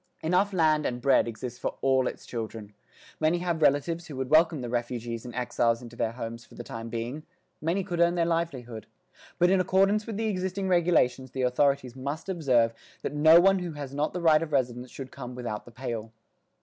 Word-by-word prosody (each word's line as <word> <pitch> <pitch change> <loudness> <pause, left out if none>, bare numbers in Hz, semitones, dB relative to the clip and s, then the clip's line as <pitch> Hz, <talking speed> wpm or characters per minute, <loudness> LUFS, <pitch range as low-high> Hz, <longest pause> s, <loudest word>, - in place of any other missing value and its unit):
Enough 180 +5 +2
land 155 -4 +2
and 120 - -3
bread 135 -1 +3
exists 120 +2 -6
for - - -3
all 130 -1 +3
its - - -6
children. 110 -3 -6 0.5
Many 155 +2 +2
have 170 -2 -2
relatives 165 +4 +2
who 150 - -8
would 130 +1 -4
welcome 160 -2 +4
the 120 - -4
refugees 120 -1 -3
and 120 -1 -8
exiles 120 -1 +1
into 120 -1 -11
their 115 -1 -1
homes 115 -1 -6
for - - -18
the 120 - -7
time 115 0 -7
being; 120 +6 -4 0.4
many 170 +5 0
could 175 -2 -4
earn 170 0 +4
their 170 -1 +2
livelihood. 135 -10 -3 0.5
But 175 +1 +4
in 190 -1 +4
accordance 195 +3 +2
with 220 -3 -4
the 225 - -1
existing 190 -1 -2
regulations 160 -8 +2
the 130 +1 -3
authorities 130 0 +1
must 140 +7 -5
observe 130 -10 +2 0.3
that - - -3
no 155 +3 +7
one 195 +2 +4
who 175 -3 -5
has 140 -2 -7
not 145 +2 0
the 180 - -4
right 160 -2 +5
of 165 -2 -4
residence 125 -2 -1
should 130 0 -8
come 125 -2 -8
without 120 -4 -5
the 120 - -13
"Pale." 115 -3 -5
140 Hz, 205 wpm, -27 LUFS, 120-170 Hz, 0.5 s, no